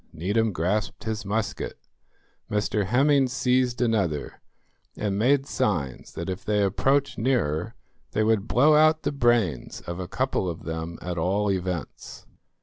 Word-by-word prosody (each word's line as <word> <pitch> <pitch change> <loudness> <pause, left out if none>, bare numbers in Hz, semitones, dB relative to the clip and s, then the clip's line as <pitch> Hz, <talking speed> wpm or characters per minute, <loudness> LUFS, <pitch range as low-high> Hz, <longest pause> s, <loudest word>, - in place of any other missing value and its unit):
Needham 105 +7 0
grasped 95 +6 -1
his 110 -2 -3
musket, 110 +1 -2 0.7
Mr 105 -1 0
Hemming 135 +4 +4
seized 125 -1 +1
another, 95 - -1 0.6
and 100 -2 -1
made 135 +4 +3
signs 80 - -2
that 85 - -5
if 95 -1 -4
they 105 -1 +1
approached 135 +8 +1
nearer 110 - 0 0.4
they 110 - +2
would 110 -1 +1
blow 145 +7 +5
out 155 +1 +4
the - - 0
brains 120 - +1
of 85 +1 -6
a 90 - -4
couple 130 -4 -1
of 85 - -6
them 80 +1 -5
at 90 -1 -3
all 100 +4 +1
events. 90 -3 -4
105 Hz, 145 wpm, -25 LUFS, 90-125 Hz, 0.7 s, blow